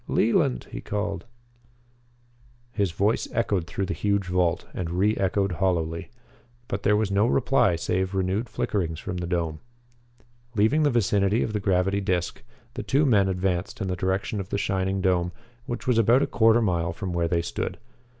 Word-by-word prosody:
Leland!" 60 -1 +2
he - - -6
called. 105 -1 -3 1.5
His 100 -5 0
voice 100 +6 0
echoed 100 -7 0
through 95 +2 -2
the 95 - -3
huge 100 -1 0
vault 90 -1 0
and 85 -2 -3
re 100 +5 +2
echoed 95 0 0
hollowly. 85 -1 -1 0.6
But 100 - -3
there 105 - +3
was 105 -2 0
no 100 +3 +3
reply 125 -6 +3
save 95 +3 -1
renewed 95 +5 -1
flickerings 85 -7 -2
from 90 - -5
the 90 -1 -3
dome. 85 -3 -2 1.0
Leaving 110 +9 +3
the 150 - +4
vicinity 105 -2 +2
of 110 - -3
the 105 - 0
gravity 95 0 +1
disc, 90 -2 -1 0.3
the - - -4
two 140 +3 +2
men 100 -7 +4
advanced 90 0 -2
in 95 - -2
the 90 - -1
direction 95 +4 -1
of 95 0 -5
the - - -1
shining 95 -1 -1
dome, 90 -2 +1 0.3
which 120 +2 -4
was 125 -3 +3
about 120 +5 +4
a - - +3
quarter 115 +1 +4
mile 85 -4 0
from 90 +1 -5
where 85 -1 +1
they 85 0 0
stood. - - -4
95 Hz, 175 wpm, -25 LUFS, 90-105 Hz, 1.5 s, the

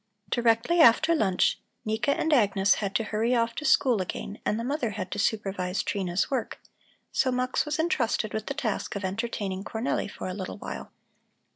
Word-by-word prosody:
Directly 240 +8 +2
after 315 +6 +6
lunch 195 - +2 0.3
Nika 220 +5 0
and 310 +2 +2
Agnes 200 -5 +4
had 200 0 -3
to 225 - +2
hurry 225 +3 0
off 230 -1 +1
to 300 - -5
school 255 -6 +4
again 200 +3 -5
and 215 - +1
the - - -3
mother 260 -2 -1
had 185 -3 -4
to - - -3
supervise 195 -3 -1
Trina's 185 +1 -1
work, 260 -4 -2 0.5
so 260 - +2
Mux 255 +3 0
was 300 +1 -1
entrusted 250 - 0
with 220 -1 -3
the 275 - -3
task 235 -8 -2
of 200 -1 -3
entertaining 195 -1 -3
Cornelli 220 0 -2
for - - -6
a 185 - -3
little 185 0 -5
while. - - -7
225 Hz, 180 wpm, -27 LUFS, 200-255 Hz, 0.5 s, after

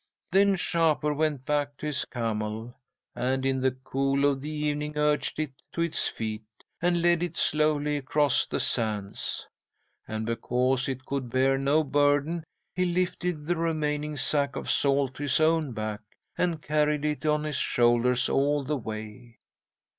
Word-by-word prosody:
"'Then 195 +1 +4
Shapur 160 -4 +1
went 145 -3 -1
back 145 -1 -1
to - - -7
his 150 -5 -1
camel, 110 0 -3 0.4
and, 130 +2 -1
in 135 -1 +1
the 130 - +4
cool 135 +2 -1
of 140 -2 +1
the 150 - -5
evening, 150 0 -2
urged 150 0 +1
it 155 -2 -2 0.2
to 170 - -2
its 170 -1 +2
feet, 110 -1 -4 0.4
and 175 -1 +2
led 175 -1 +4
it 175 -1 -3
slowly 150 -1 +2
across 145 0 +2
the - - -2
sands. 105 -4 -1 0.6
And 110 0 -3
because 125 +3 0
it 130 0 -4
could 135 -3 -3
bear 135 +2 +2
no 145 +3 +3
burden, 145 +3 +2 0.3
he 185 - 0
lifted 175 -3 -1
the 175 +2 0
remaining 150 -2 -1
sack 140 +1 +1
of - - -2
salt 140 -1 +2
to - - -7
his 145 -1 +2
own 160 -2 +2
back, 110 -1 -4 0.3
and 170 -3 -1
carried 150 0 +1
it 150 0 -1
on 150 0 +2
his 150 -3 -2
shoulders 120 +1 +3
all 145 +1 +1
the 150 +2 -1
way. 110 +1 -8
145 Hz, 160 wpm, -27 LUFS, 130-155 Hz, 0.6 s, Then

